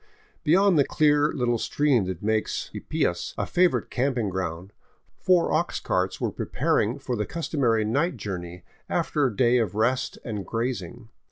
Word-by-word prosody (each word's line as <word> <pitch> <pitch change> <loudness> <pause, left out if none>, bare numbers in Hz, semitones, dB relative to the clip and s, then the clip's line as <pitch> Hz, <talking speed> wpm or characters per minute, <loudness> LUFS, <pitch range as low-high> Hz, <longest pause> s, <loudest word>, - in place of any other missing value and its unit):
Beyond 180 +2 +4
the - - +6
clear 150 +1 +3
little 120 -3 0
stream 140 -7 +2
that 95 -1 -5
makes 110 0 -1
Ypias - - -2
a - - -1
favorite 180 0 +1
camping 125 -4 0
ground, 90 0 -4 0.5
four 180 -2 +3
ox 170 +2 0
carts 90 +1 -1
were - - -1
preparing 115 +6 0
for 130 -3 -3
the 105 -2 -2
customary 130 -10 0
night 145 +8 0
journey 90 -4 -6 0.3
after 145 -3 +1
a 115 - -5
day 125 0 +4
of 105 -5 -1
rest 125 +4 0
and 105 -4 -4
grazing. 115 -1 -4
120 Hz, 155 wpm, -25 LUFS, 105-145 Hz, 0.5 s, the